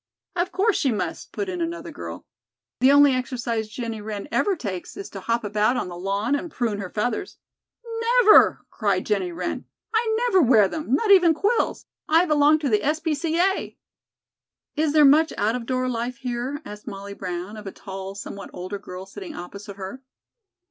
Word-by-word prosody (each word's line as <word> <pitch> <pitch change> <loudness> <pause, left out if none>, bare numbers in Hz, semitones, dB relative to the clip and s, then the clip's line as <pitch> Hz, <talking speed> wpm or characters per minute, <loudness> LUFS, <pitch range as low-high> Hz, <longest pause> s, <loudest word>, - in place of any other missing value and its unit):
"Of 355 +1 0
course 395 +3 +2
she 270 - +1
must," 215 - -4
put 400 - -3
in 360 -2 -3
another 335 +1 -4
girl. - - -8 0.5
"The 260 +2 +6
only 285 -1 +7
exercise 240 -3 -2
Jennie 225 -1 -5
Wren 210 +1 -5
ever 400 +3 +2
takes 190 - -6
is 200 - -7
to 195 - -7
hop 230 +4 -1
about 215 +4 +1
on - - -2
the 175 - -7
lawn 200 +7 -1
and 285 +4 -1
prune 230 -8 -2
her 190 -2 -5
feathers." 245 - -2 0.9
"Never!" 425 - +6
cried 200 -4 0
Jennie 195 -4 0
Wren. 175 +1 -4 0.3
"I 445 0 +2
never 380 -6 +4
wear 230 -7 +5
them, 300 0 -1
not 410 +8 +2
even 355 -5 +7
quills. 410 +8 0 0.2
I 325 +3 +5
belong 300 -1 +4
to 285 - 0
the 210 -2 +2
S. 305 +2 +1
P. 320 -1 -1
C. 325 +3 -1
A." 385 +2 0 1.0
"Is 305 -1 +1
there 305 -1 +7
much 310 +4 +5
out 215 +2 +1
of 240 -1 -4
door 255 0 0
life 240 0 -3
here?" 255 +4 -4
asked 210 0 -10
Molly 200 0 -7
Brown, 185 +1 -5
of 210 -2 -9
a - - -4
tall, 195 0 -8
somewhat 200 0 -7
older 185 +3 -5
girl 185 -1 -8
sitting 195 -1 -9
opposite 200 +3 -8
her. 195 +6 -7
240 Hz, 190 wpm, -24 LUFS, 200-310 Hz, 1.0 s, only